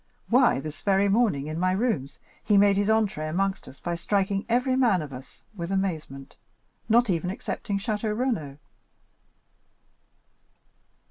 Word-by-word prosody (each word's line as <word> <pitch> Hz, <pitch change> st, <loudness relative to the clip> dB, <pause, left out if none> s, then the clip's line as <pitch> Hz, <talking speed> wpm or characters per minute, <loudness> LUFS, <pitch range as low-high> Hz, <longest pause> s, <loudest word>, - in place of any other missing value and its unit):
Why, 245 Hz, -, +4 dB
this 155 Hz, +1 st, -8 dB
very 200 Hz, 0 st, +2 dB
morning, 200 Hz, -, +2 dB
in 155 Hz, +2 st, -4 dB
my 185 Hz, +1 st, +2 dB
rooms, 195 Hz, -, -1 dB, 0.3 s
he 210 Hz, -1 st, +3 dB
made 200 Hz, 0 st, +5 dB
his 200 Hz, +1 st, +1 dB
entrée 210 Hz, -8 st, +1 dB
amongst 195 Hz, +4 st, -1 dB
us 135 Hz, -, -13 dB
by 175 Hz, -, -3 dB
striking 195 Hz, +3 st, -1 dB
every 250 Hz, +2 st, +2 dB
man 230 Hz, -10 st, +3 dB
of 140 Hz, -2 st, -9 dB
us 130 Hz, +1 st, -12 dB
with 170 Hz, -1 st, -5 dB
amazement, 160 Hz, -8 st, -3 dB, 0.5 s
not 235 Hz, +2 st, +4 dB
even 175 Hz, +1 st, -1 dB
excepting 200 Hz, +1 st, -4 dB
Château 210 Hz, +1 st, -2 dB
Renaud." 205 Hz, -, -2 dB
195 Hz, 140 wpm, -26 LUFS, 160-215 Hz, 0.5 s, made